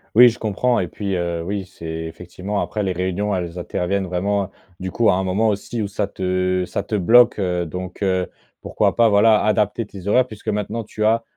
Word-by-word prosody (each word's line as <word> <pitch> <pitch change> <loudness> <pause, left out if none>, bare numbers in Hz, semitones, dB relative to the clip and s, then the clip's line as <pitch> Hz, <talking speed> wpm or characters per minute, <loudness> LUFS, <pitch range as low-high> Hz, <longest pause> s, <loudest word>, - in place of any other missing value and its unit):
Oui, 120 +2 +9
je 120 - -8
comprends 115 +3 +1
et 90 - -1
puis, 100 +2 -3
heu, 85 -1 -2
oui, 100 +2 -3
c'est 90 -2 -13 0.2
effectivement 90 +5 -5
après 105 - -3
les 95 -2 -1
réunions, 95 +3 -1
elles 90 -1 -4
interviennent 95 +2 -1
vraiment, 100 +2 -1 0.3
du 95 0 -4
coup, 115 +3 +2
à 95 - +4
un 95 - 0
moment 100 +4 +1
aussi 105 +3 -3
où 105 - -1
ça 100 0 -2
te 95 -1 0
ça - - -3
te 110 - -3
bloque, 115 +5 +5
heu, 90 -2 0
donc 90 +4 -7
heu, 95 -2 +1 0.3
pourquoi - - 0
pas, 115 -1 +5
voilà, 105 +1 +5
adapter 105 +1 +1
tes 100 -2 -10
horaires, 125 +5 +4
puisque 110 -2 -13
maintenant, 110 +2 -2
tu 110 0 -5
as 115 +1 +3
100 Hz, 210 wpm, -21 LUFS, 90-110 Hz, 0.3 s, Oui